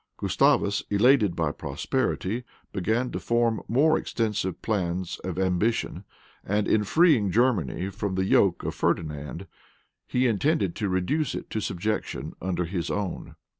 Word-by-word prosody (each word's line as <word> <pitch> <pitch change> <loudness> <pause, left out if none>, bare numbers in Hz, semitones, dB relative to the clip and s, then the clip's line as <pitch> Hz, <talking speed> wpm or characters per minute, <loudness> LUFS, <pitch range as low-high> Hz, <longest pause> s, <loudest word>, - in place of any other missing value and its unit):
Gustavus, 100 +1 +2
elated 105 -2 +4
by 80 -3 0
prosperity, 110 +9 -2 0.3
began 110 +6 0
to - - -3
form 120 -1 +1
more 150 +7 +3
extensive 105 -6 -2
plans 90 -4 -2
of 90 -2 -5
ambition; 95 +5 0 0.4
and 105 +1 0
in 105 - +3
freeing 150 - +4
Germany 95 - +1
from 100 -1 -3
the 95 0 +1
yoke 95 -2 +3
of - - -2
Ferdinand, 75 -4 -2 0.6
he 125 +1 +1
intended 120 - +1
to 105 -3 -1
reduce 95 - 0
it - - -7
to 110 - -2
subjection 105 +3 -3
under 90 -1 -1
his 85 0 -3
own. 100 -4 -4
100 Hz, 135 wpm, -26 LUFS, 90-115 Hz, 0.6 s, elated